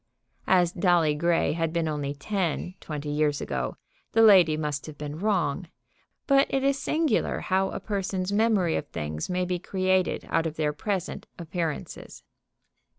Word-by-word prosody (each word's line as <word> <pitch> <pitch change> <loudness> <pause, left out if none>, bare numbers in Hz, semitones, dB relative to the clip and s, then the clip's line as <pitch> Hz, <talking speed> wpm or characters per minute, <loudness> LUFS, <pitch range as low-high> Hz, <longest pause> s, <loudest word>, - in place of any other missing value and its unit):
As 180 -2 +4
Dolly 175 -4 +3
Grey 165 0 +1
had 165 0 -1
been 165 -1 0
only 145 -2 -2
ten 180 +2 -2
twenty 150 -1 -5
years 150 -1 +1
ago, - - -3 0.4
the 225 - +5
lady 180 -8 +7
must 150 -2 -3
have 155 -2 -9
been 150 +1 -6
wrong. 185 -5 0 0.6
But 275 0 +4
it 270 0 0
is 275 0 +2
singular 310 -7 0
how 190 +1 +1
a - - -5
person's 195 -2 -2
memory 205 -6 +2
of - - -3
things 75 -1 -4
may 180 0 0
be 180 0 -2
created 185 0 0
out 165 - +2
of 155 - -6
their 150 -2 0
present 195 0 -3
appearances. 165 -2 -5
175 Hz, 155 wpm, -26 LUFS, 150-195 Hz, 0.6 s, lady